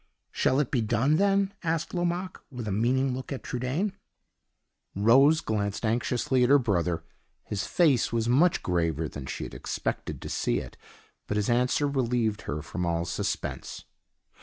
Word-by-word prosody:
"Shall 130 - +2
it 145 - 0
be 125 - +2
done, 120 +7 +2
then?" 200 0 +2
asked 165 -1 -1
Lomaque, 175 +1 -2
with 125 -4 -6
a - - -1
meaning 125 +6 +1
look 130 +2 -6
at 135 - -4
Trudaine. 135 - -2 1.0
Rose 135 +10 +5
glanced 105 0 -2
anxiously 125 +3 +1
at 125 - +3
her 140 - +8
brother; 90 - 0 0.4
his 100 -2 -3
face 150 -9 +3
was 115 -1 0
much 150 +9 +3
graver 85 -3 0
than 70 -2 -8
she - - -4
had - - -7
expected - - -4
to - - -7
see - - 0
it, - - -6 0.5
but 105 - -1
his 105 +3 +1
answer 125 +4 +2
relieved 120 -6 0
her 75 +1 -3
from 90 +2 -4
all 85 -1 0
suspense. 85 - -4
125 Hz, 160 wpm, -27 LUFS, 105-145 Hz, 1.0 s, her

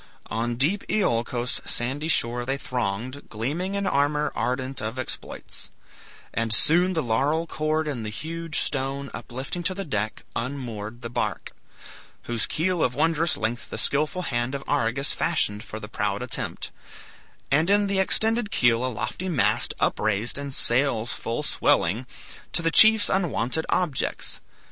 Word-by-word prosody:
On 120 +1 -1
deep 160 +12 +1
Iolcos' 120 - 0
sandy 135 +6 -2
shore 120 -6 +1
they 135 +2 -1
thronged, 125 +1 -3
Gleaming 150 - -2
in 200 0 -1
armor, 150 -1 +1
ardent 130 +1 -2
of 110 +4 -4
exploits; 130 - -6 0.6
And 115 -1 0
soon, 175 +10 +5
the 160 - +1
laurel 140 +8 +1
cord 155 -1 -1
and 130 -6 -3
the 105 - -3
huge 165 +6 -4
stone 140 0 -2
Uplifting 130 +8 -5
to 185 +2 0
the 195 0 -4
deck, 105 -6 -2
unmoored 120 -3 -4
the 115 - -5
bark; - - -2 0.7
Whose 120 -2 -1
keel 175 +1 0
of 125 - 0
wondrous 165 - +2
length 115 +4 -3
the - - -5
skilful 155 +6 +2
hand 120 -1 -1
Of 135 - -5
Argus 140 0 +2
fashioned 105 -11 0
for - - -7
the - - -8
proud - - -2
attempt; - - -3 0.8
And 155 +6 +3
in 205 +1 +4
the 200 -1 +1
extended 220 +3 +3
keel 120 - +3
a - - +1
lofty 175 - -4
mast 155 -8 +2
Upraised, 110 +2 +1
and 140 0 -4
sails 120 -2 +3
full 115 +6 -3
swelling; 115 - +1 0.5
to 170 - +1
the 165 - +2
chiefs 220 +3 +8
Unwonted 160 -5 0
objects. 175 -7 +1
135 Hz, 150 wpm, -25 LUFS, 120-165 Hz, 0.8 s, chiefs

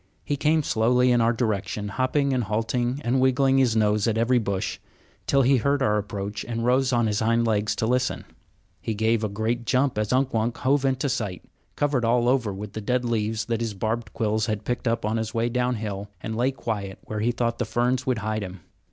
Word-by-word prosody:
He 145 - 0
came 155 +2 +2
slowly 125 +1 +3
in 120 -1 +3
our 115 +1 +4
direction, 105 -3 -2
hopping 135 +5 0
and 125 -3 0
halting 120 +5 -1
and 125 +2 +1
wiggling 135 +1 +3
his 125 -4 +3
nose 105 -1 +2
at 110 -1 +1
every 120 +2 +3
bush, 100 -4 -2 0.5
till 140 -1 +4
he 135 +2 +4
heard 140 +3 +1
our 105 -4 +2
approach 100 0 -5
and 115 -1 -3
rose 130 +1 +3
on 120 -2 +2
his 105 -1 0
hind 115 +1 +2
legs 110 -2 +1
to - - -1
listen. 125 +2 0 0.6
He 110 - -3
gave 110 +1 +1
a 105 - 0
great 110 +4 -2
jump 130 0 +1
as 105 -1 -1
Unk 130 +1 +1
Wunk 115 +1 0
hove 140 +1 +1
into 135 +1 +1
sight, 110 -9 -3 0.3
covered 145 -4 +1
all 120 +1 +2
over 125 -5 +2
with 100 +1 -7
the 110 - -5
dead 125 +3 0
leaves 110 -1 -1
that 115 -1 -2
his 115 -3 -3
barbed 110 +2 -2
quills 110 -1 0
had 105 -1 -3
picked 125 0 -2
up 115 -1 0
on 110 +2 0
his 110 0 -3
way 115 +1 +1
downhill, 110 -5 -2
and 110 0 -5
lay 125 +3 +2
quiet 105 -7 -4
where 110 - -5
he 115 +3 +1
thought 115 -1 -1
the - - +1
ferns 120 +3 0
would 130 -2 +1
hide 110 0 -1
him. 95 -2 -7
115 Hz, 220 wpm, -25 LUFS, 110-125 Hz, 0.6 s, our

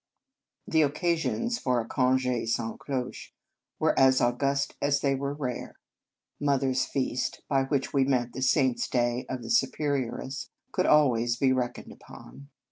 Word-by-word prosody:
The 160 - +3
occasions 170 - 0
for 125 -2 +1
a 115 - -4
conge 130 0 +1 0.2
sans 115 -1 -2
cloche 130 -3 -5 0.4
were - - +2
as 130 -1 +5
august 140 +3 0
as 140 0 +2
they 140 -1 +2
were 140 +1 -3
rare. 125 -5 -5 0.4
" - - -57
Mother 135 -1 +2
s 130 - 0
Feast," 130 -2 -2
by 135 -2 +2
which 135 -1 -1
we 135 -1 +4
meant 125 -3 0
the 130 - -5
saint 130 -1 +2
s - - -1
day 120 0 0
of 130 -2 -4
the - - -5
Superior 145 - 0
ess, 135 +1 -6 0.2
could 185 - 0
always 120 -6 +3
be 130 0 +3
reckoned 125 -2 -3
upon. 140 0 -13
135 Hz, 165 wpm, -28 LUFS, 125-140 Hz, 0.4 s, as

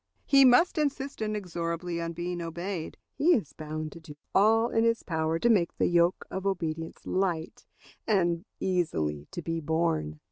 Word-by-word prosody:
He 275 -1 +6
must 285 +7 +5
insist 280 -3 -2
inexorably 175 -5 -3
on 165 0 -3
being 175 +1 -4
obeyed; 170 +1 -5 0.2
but - - -2
he 350 +3 +6
is 195 - -3
bound 155 0 -5
to 170 - -11
do 160 -3 -12 0.2
all 225 +3 +4
in 225 - +2
his 230 0 +1
power 160 -1 -1
to 235 - +1
make 195 -8 +2
the - - +2
yoke 175 +1 +2
of 190 +1 -3
obedience 165 -4 -3
light 175 -4 -2 0.4
and 175 -5 +2 0.2
easily 80 - -1
to 175 - -6
be 165 +1 -2
borne. 150 - -1
175 Hz, 170 wpm, -28 LUFS, 160-210 Hz, 0.4 s, He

